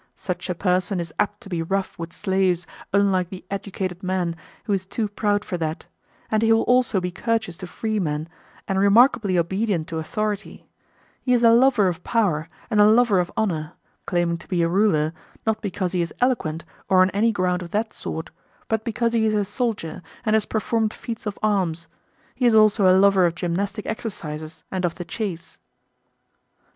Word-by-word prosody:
Such 180 0 -5
a 180 - -1
person 185 +1 0
is 170 -2 -5
apt 205 0 0
to - - -11
be 175 -3 -2
rough 190 +3 -2
with 165 0 -5
slaves, 185 -1 0 0.3
unlike 195 -3 +2
the 185 -1 -9
educated 190 -2 -4
man, 180 -2 -1 0.3
who 205 - -1
is 190 -1 0
too 220 +2 -2
proud 205 0 0
for 180 - -3
that; 160 -1 -3 0.5
and 215 0 +2
he 225 0 +3
will 225 0 +4
also 245 -5 +3
be 180 0 -3
courteous 220 -2 -1
to 185 -1 -7
freemen, 175 -8 -2 0.4
and 190 0 0
remarkably 205 -1 +4
obedient 185 0 0
to 165 -2 -3
authority; 210 +6 -3 0.6
he 250 - +1
is 240 -1 +3
a 230 - +7
lover 235 -4 +5
of 175 -1 -3
power 180 -9 0 0.2
and 210 -1 +4
a 205 - +7
lover 220 -3 +5
of 175 - -1
honour; 160 -8 -1 0.3
claiming 175 -2 0
to - - -15
be 175 -3 +1
a - - +3
ruler, 170 -4 +2 0.3
not 220 -1 0
because 190 -3 -2
he 180 - 0
is 170 - -2
eloquent, 190 -11 0 0.2
or 185 -1 +6
on 185 - +1
any 220 +3 +2
ground 180 -3 0
of 175 - -7
that 215 +3 -1
sort, 160 - -6 0.4
but 220 -1 0
because 230 +1 -1
he 220 -1 +3
is 215 - +1
a 205 -1 +1
soldier 210 -6 -3 0.2
and 215 - +2
has 220 -1 +3
performed 220 0 0
feats 225 -2 -6
of 205 - -4
arms; 180 -6 0 0.5
he 250 -1 +2
is 230 - +4
also 215 -2 +5
a 185 0 +6
lover 195 -2 +5
of 170 - -3
gymnastic 195 +5 -2
exercises 160 -8 -6
and 185 -1 -2
of 170 -1 0
the 175 - -6
chase. 175 -2 -5
195 Hz, 190 wpm, -23 LUFS, 175-215 Hz, 0.6 s, a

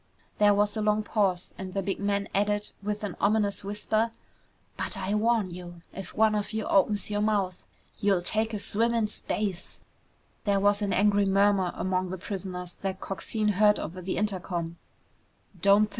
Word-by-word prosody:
There 205 -1 +6
was 205 +1 +2
a 215 - -1
long 210 0 +2
pause 195 -4 0
and 190 0 -6
the 195 - 0
big 195 - -2
man 200 0 0
added 205 +1 0
with 210 +1 -3
an 200 -4 -3
ominous 200 -1 +2
whisper, 215 +3 0 0.7
"But - - -4
I 200 - -2
warn 215 -3 +2
you, 175 -1 -9
if 195 - -8
one 220 0 +4
of 210 +1 -2
you 220 -1 -2
opens 205 +2 +2
your 205 0 0
mouth, 200 -4 0 0.4
you'll 195 -3 +2
take 220 +4 +2
a 215 - -2
swim 230 +3 +1
in 230 -2 +2
space!" 205 -3 -3 0.6
There 200 -1 +2
was 205 +1 +3
an 200 -1 0
angry 205 0 +3
murmur 195 -2 +3
among 185 0 -1
the 190 - -4
prisoners 180 -2 -5
that 190 -1 -3
Coxine 210 +3 -1
heard 210 0 +5
over 180 +4 -5
the 185 +1 -3
intercom. 180 -5 -2
200 Hz, 170 wpm, -28 LUFS, 190-210 Hz, 0.7 s, There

